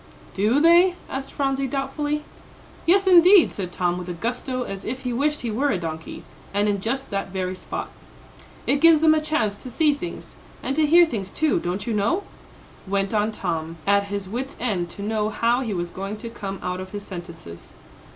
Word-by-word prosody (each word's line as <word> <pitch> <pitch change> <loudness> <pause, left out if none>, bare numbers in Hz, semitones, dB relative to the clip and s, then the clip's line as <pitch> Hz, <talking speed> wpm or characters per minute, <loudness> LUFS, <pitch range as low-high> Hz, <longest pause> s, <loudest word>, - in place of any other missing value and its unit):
"Do 215 +8 +2
they?" 345 +3 +6 0.2
asked 270 0 -4
Phronsie, 275 -1 0
doubtfully. 290 +3 -2 0.6
"Yes, 390 +3 +5
indeed," 365 0 +7
said 185 -3 -5
Tom, 175 0 0
with 180 0 -7
a - - -2
gusto, 250 +6 -3
as 195 -4 -6
if 255 +3 -4
he 250 -1 -2
wished 295 +4 0
he 235 - -3
were 270 +7 +1
a 205 - +1
donkey, 160 -2 -6 0.3
and 205 +1 +2
in 200 -2 0
just 265 +5 -3
that 195 0 -2
very 185 -1 -3
spot, 185 - -5 0.8
"it 280 0 +2
gives 330 -2 +7
them 315 -1 +6
a 310 - +2
chance 300 -10 0
to 255 - -9
see 295 +4 +3
things, 345 +5 -7 0.3
and 270 - -1
to 310 0 +3
hear 340 +3 +7
things, 205 - -5
too, 310 -1 +1
don't 185 +3 -3
you 235 - -1
know?" 225 - +1 0.6
went 195 +1 0
on 215 0 +1
Tom, 165 -5 -3
at 200 0 +3
his 200 -1 -4
wits' 250 +7 -4
end 195 -8 -1
to 200 - -8
know 215 0 0
how 235 +3 +1
he 235 -4 -3
was 175 -3 -3
going 195 +3 -5
to 230 +1 -7
come 195 -4 -5
out 180 0 -2
of 185 +1 -8
his 205 0 -6
sentences. 170 - -9
220 Hz, 200 wpm, -23 LUFS, 195-285 Hz, 0.8 s, indeed